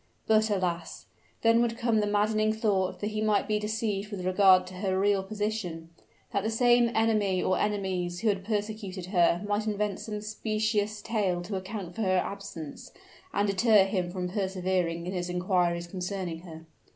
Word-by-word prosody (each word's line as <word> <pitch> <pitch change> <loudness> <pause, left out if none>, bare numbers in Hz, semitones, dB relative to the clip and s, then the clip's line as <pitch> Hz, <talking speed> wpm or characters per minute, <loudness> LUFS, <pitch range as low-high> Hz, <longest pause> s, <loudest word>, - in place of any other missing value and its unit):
But, 220 0 +3
alas! 175 -4 -2 0.4
then 230 +1 +5
would 230 -1 0
come 230 -2 +2
the 210 - +1
maddening 215 +1 +2
thought 205 -4 0
that 210 +1 -2
he 215 0 -2
might 210 -2 +2
be 210 0 +1
deceived 210 -1 -2
with 195 -4 -5
regard 185 0 +5
to 185 - -10
her 190 -1 0
real 200 0 +3
position; 200 -5 -4 0.4
that 200 - 0
the 220 - 0
same 240 +1 +4
enemy 215 -4 +2
or 185 - +1
enemies 185 -4 -1
who 225 - +2
had 195 -2 -1
persecuted 205 -3 -3
her 175 0 +3
might 205 +1 0
invent 210 -2 -1
some 210 -1 -5
specious 215 0 -1
tale 195 -6 0
to 195 +3 -5
account 190 -1 -5
for 225 - -5
her 185 -3 +2
absence, 180 -6 -5 0.4
and 205 +1 +1
deter 205 +1 +5
him 190 -3 -1
from 180 0 -3
persevering 185 -3 -1
in 180 - -4
his 180 -1 -3
inquiries 180 -1 +1
concerning 180 -1 -4
her. 165 -2 -11
200 Hz, 175 wpm, -28 LUFS, 185-215 Hz, 0.4 s, then